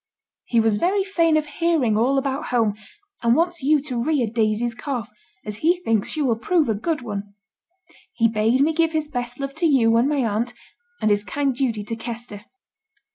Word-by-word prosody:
He 235 - +2
was 220 -2 +2
very 385 - +1
fain 335 -5 +2
of 305 - 0
hearing 295 -7 +1
all 250 +5 +2
about 275 +2 -2
home; 225 -4 +1 0.5
and 235 0 +3
wants 345 +1 0
you 295 +3 +3
to 250 -5 -3
rear 285 -1 +1
Daisy's 220 +1 0
calf, 240 -2 -5 0.3
as 210 -1 -5
he 335 +7 +3
thinks 225 - 0
she 310 - -1
will 235 -5 +1
prove 330 +5 +2
a - - +3
good 300 +8 -2
one. 205 -2 -6 0.8
He 230 - +3
bade 225 +4 +1
me 310 +3 +3
give 330 0 +1
his 310 -1 0
best 245 -3 -4
love 275 0 -4
to 340 0 +2
you 235 -6 +4
and 245 +4 +3
my 285 -4 +1
aunt, 225 +3 -1 0.5
and 215 - +3
his 205 0 +2
kind 275 +5 -1
duty 240 -5 -1
to 230 +2 -4
Kester. 225 -2 -7
245 Hz, 195 wpm, -22 LUFS, 225-305 Hz, 0.8 s, you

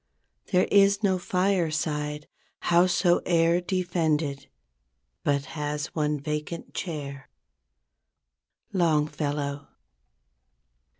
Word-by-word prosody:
There 185 -2 +4
is 200 +1 +5
no 190 -2 +2
fireside, 160 -5 -1 0.3
howsoe'er 175 -1 +3
defended, 165 -6 -1 0.8
But 140 -1 +1
has 150 -1 -3
one 150 -2 0
vacant 150 +3 -5
chair. 140 -6 -5 1.4
—Longfellow. 150 -4 0
155 Hz, 65 wpm, -26 LUFS, 150-180 Hz, 1.4 s, is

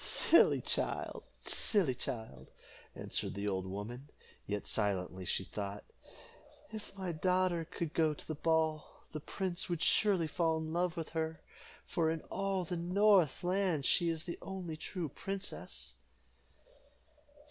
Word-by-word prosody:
"Silly - - +5
child, - - -2 0.2
silly 185 - +3
child," 110 - -5 0.5
answered - - -3
the 100 +1 -2
old 95 -2 -1
woman; 115 +8 -6 0.4
yet 105 0 -2
silently 95 -3 0
she 95 - +1
thought 100 +1 -5 0.9
"If 215 -2 -8
my 190 -2 -2
daughter 180 0 +2
could 170 -1 -4
go 155 -2 +3
to - - -10
the 155 - -2
ball, 160 0 0
the 155 - -4
prince 185 +4 -2
would 170 -2 -1
surely 195 -6 +4
fall 160 +1 +1
in 160 0 -4
love 175 0 +1
with 165 - -3
her, 160 0 -2 0.5
for 165 -2 +1
in 160 -1 -1
all 195 -2 0
the 175 +1 -2
north 180 -3 +4
land 180 -5 +1
she 170 -2 +4
is 160 -1 -2
the 170 - -5
only 185 -4 -5
true 165 +2 -4
princess." 195 +4 -5
165 Hz, 140 wpm, -34 LUFS, 140-180 Hz, 0.9 s, Silly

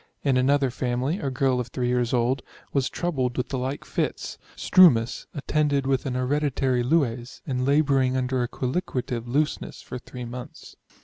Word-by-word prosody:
In 135 -3 +2
another 135 +1 +3
family, 130 +7 -1
a 140 - -2
girl 130 -1 +1
of 120 - -2
3 125 +1 -2
years 125 -1 +1
old, 125 +1 +1 0.3
was 135 -2 +1
troubled 130 -8 -1
with 125 - -1
the 135 - -2
like 130 +3 -3
fits, - - -3 0.2
strumous, 135 -11 +5
attended 145 -1 +1
with 135 0 0
an 125 - -2
hereditary 130 -1 +1
lues, 125 -3 0
and 130 -1 -1
labouring 135 -3 +3
under 130 0 0
a 120 - 0
colliquative 125 -4 -3
looseness 145 +5 -1
for 125 - -7
3 125 0 -8
months. 120 +1 -9
130 Hz, 165 wpm, -25 LUFS, 125-140 Hz, 0.3 s, strumous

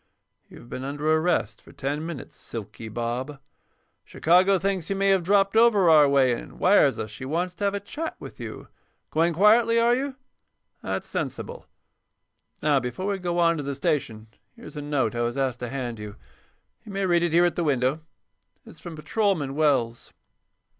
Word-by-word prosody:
"You've 120 - -14
been 130 - -6
under 145 +3 -1
arrest 160 - 0
for - - -16
ten 145 +3 -3
minutes, 165 -5 -7
'Silky' 110 0 -8
Bob. 120 +5 -4 0.6
Chicago 185 +4 +3
thinks 190 -2 -2
you 195 - 0
may 195 0 +2
have 195 -1 +4
dropped 195 +3 +2
over 215 -6 +5
our 150 -2 +6
way 135 -3 +4
and 115 - -8
wires 180 -8 +4
us 105 - -5
she 110 - -9
wants 170 +7 -2
to 200 +3 -3
have 200 0 +1
a - - -2
chat 300 +11 -5
with - - -11
you. - - -8 0.4
Going 165 +2 +2
quietly, 225 +6 +4
are 235 +1 +4
you? 265 +2 -2 0.7
That's - - -4
sensible. 485 +1 -5 1.0
Now, 145 -2 +3
before 125 +8 -5
we 195 - -2
go 175 -1 -2
on 170 -1 +3
to 145 - -4
the 140 0 -4
station 120 -6 -2 0.3
here's 235 -7 -12
a 150 - -5
note 145 -6 -1
I 120 - -2
was 120 +2 -1
asked 130 -3 -1
to 125 - -5
hand 120 -4 -4
you. 105 -1 -8 0.7
You 215 - -10
may 195 0 -1
read 175 -2 +3
it 175 -1 0
here 175 +1 +5
at 175 - 0
the 175 - -1
window. 135 0 +1 0.6
It's - - -14
from 170 -2 -8
Patrolman 155 -3 -1
Wells." 135 -6 0
155 Hz, 185 wpm, -25 LUFS, 130-195 Hz, 1.0 s, our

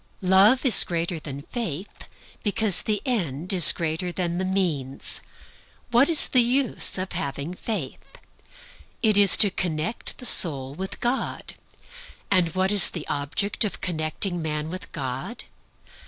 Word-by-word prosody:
Love 200 +8 +4
is 240 -7 +8
greater 170 0 -3
than 140 -2 -8
faith, 195 - -7 0.3
because 205 -3 +1
the 210 -2 -3
end 180 - -2
is 175 -4 +9
greater 165 +2 -3
than 175 -1 -3
the - - -2
means. 165 -9 -2 0.7
What 245 +5 +3
is 325 -3 +5
the 255 - +4
use 250 -1 +1
of 185 0 -5
having 140 +4 -5
faith? 185 - -6 1.0
It 215 -2 +2
is 200 -2 +6
to 205 - +6
connect 175 +4 -3
the 250 - -8
soul 135 - +4
with 190 +5 -7
God. 245 +2 -4 0.8
And 180 -4 +1
what 190 +1 0
is 205 -3 +1
the 165 - -8
object 145 +11 -1
of 210 - -4
connecting 175 +1 -3
man 155 0 -4
with 185 +1 -9
God? 135 - -6
185 Hz, 140 wpm, -23 LUFS, 155-210 Hz, 1.0 s, is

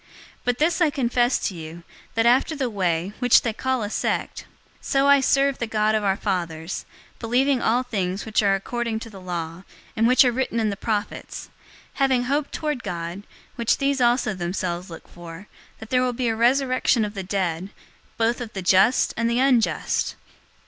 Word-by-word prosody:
024:014 - - -28 0.4
But 245 -1 +1
this 330 +4 +1
I 320 - +5
confess 245 -3 +1
to - - -4
you, 165 0 -9 0.3
that 225 0 +2
after 255 +6 +3
the 265 -5 -2
Way, 180 -1 -1
which 245 -2 +5
they 230 - -1
call 260 0 -1
a 205 - -3
sect, - - -2 0.4
so 275 0 +1
I 280 0 +6
serve 275 +1 +2
the 235 - -2
God 215 -1 +1
of 215 -1 +1
our 195 -1 +1
fathers, 165 -1 -3 0.3
believing 250 +3 +1
all 245 +3 +2
things 195 -6 -3
which 220 -1 +1
are 200 -2 +3
according 230 +3 -3
to 230 - -9
the 195 -2 -11
law, 170 -1 -5 0.3
and 225 +1 +3
which 255 +1 +6
are 250 - +3
written 245 -1 -1
in 215 -2 +1
the - - -3
prophets; 210 0 -4 0.4
024:015 - - -23
having 265 -2 +3
hope 285 +3 -1
toward 300 -5 -3
God, 170 +1 -5 0.4
which 235 -1 +1
these 275 -1 0
also 240 -3 +2
themselves 180 0 -3
look 165 - -11
for, 170 +2 -11 0.3
that 220 - -12
there 250 -1 +3
will 250 -1 0
be 245 -1 -1
a 225 - 0
resurrection 255 -1 +2
of 205 - -6
the 195 - -4
dead, 185 -2 -2 0.5
both 230 +2 +1
of 235 -1 -7
the 190 - -5
just 190 +7 +4
and 230 0 0
unjust. 245 -1 +1
225 Hz, 190 wpm, -23 LUFS, 190-255 Hz, 0.5 s, I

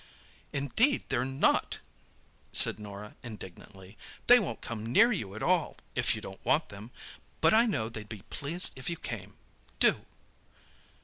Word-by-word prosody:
"Indeed, 185 - +1
they're 125 -2 +1
not!" 135 +1 +1 0.8
said - - +5
Norah 105 0 -9
indignantly. 95 -2 -11 0.3
"They 245 +1 +8
won't 210 - -4
come 110 -2 -6
near 205 - +4
you 105 - -4
at 110 - -6
all, 180 -3 +1 0.2
if - - +1
you - - -7
don't - - -10
want - - +1
them—but 105 - -3
I 230 +2 +5
know 125 - -1
they'd 110 -2 -8
be 105 -3 -8
pleased 160 +5 +1
if 130 +3 -5
you 170 - -3
came. 105 -7 -7 0.4
Do!" - - +3
120 Hz, 145 wpm, -30 LUFS, 105-170 Hz, 0.8 s, They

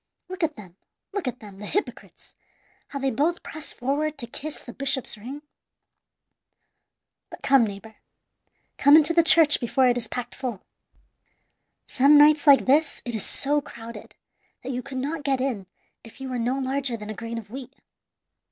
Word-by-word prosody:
Look 370 0 -7
at 310 -2 -1
them, 185 -4 -14 0.4
look 395 -8 -3
at 250 0 -5
them, 200 -2 -12
the 210 - -7
hypocrites, 410 - -5 0.5
how 280 - -7
they 270 -1 -1
both 310 +9 -1
press 310 -2 -7
forward 290 +4 -2
to 255 - -4
kiss 300 +6 -8
the 240 - -12
bishop's 270 -3 +2
ring! 260 +8 -9 1.9
"But - - -12
come, 270 -3 +4
neighbor 210 +2 -10 0.8
come 285 +2 +7
into 315 +1 +4
the 335 - +5
church 325 -2 +7
before 255 +1 +1
it 245 0 +2
is 225 - -6
packed 245 +1 -6
full. 245 -7 -6 1.2
Some 280 +3 +4
nights 295 +1 +5
like 280 -1 +7
this 285 +3 +1
it 240 - -4
is 220 - -3
so 290 +1 +1
crowded 230 -4 -11 0.5
that 260 - -5
you 250 0 -3
could 265 0 -8
not 290 +4 -3
get 275 -2 -1
in 245 -8 -3 0.4
if 225 +4 -15
you 265 -1 -6
were 250 -1 -3
no 245 +3 -1
larger 265 -2 -2
than 210 0 -8
a - - -5
grain 230 +1 -7
of 215 -2 -9
wheat. 265 +1 -9
265 Hz, 175 wpm, -24 LUFS, 235-290 Hz, 1.9 s, come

